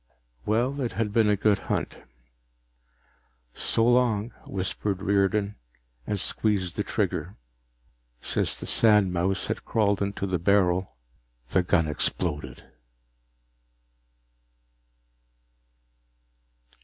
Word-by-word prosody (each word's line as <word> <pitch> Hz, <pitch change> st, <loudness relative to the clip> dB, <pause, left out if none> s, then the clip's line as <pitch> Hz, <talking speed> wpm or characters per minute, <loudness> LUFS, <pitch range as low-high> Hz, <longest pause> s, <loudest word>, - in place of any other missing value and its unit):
Well, 125 Hz, +6 st, +1 dB
it 120 Hz, -, -2 dB
had 110 Hz, -3 st, -2 dB
been 110 Hz, -2 st, +4 dB
a 105 Hz, -, +4 dB
good 100 Hz, 0 st, +2 dB
hunt. -, -, -2 dB, 1.6 s
"So 115 Hz, -, 0 dB
long," 120 Hz, -2 st, +2 dB, 0.2 s
whispered 95 Hz, +1 st, -3 dB
Riordan, 100 Hz, +1 st, +1 dB, 0.5 s
and 105 Hz, -, -1 dB
squeezed 95 Hz, -3 st, 0 dB
the -, -, -1 dB
trigger. -, -, -2 dB, 0.8 s
Since -, -, -1 dB
the -, -, -8 dB
sandmouse 95 Hz, -4 st, +2 dB
had -, -, -3 dB
crawled 100 Hz, -3 st, +1 dB
into 100 Hz, 0 st, -2 dB
the 95 Hz, -2 st, -1 dB
barrel, 95 Hz, -2 st, +2 dB, 0.5 s
the 95 Hz, -, +3 dB
gun 90 Hz, -3 st, +2 dB
exploded. 75 Hz, -3 st, -2 dB
100 Hz, 95 wpm, -26 LUFS, 90-110 Hz, 1.6 s, been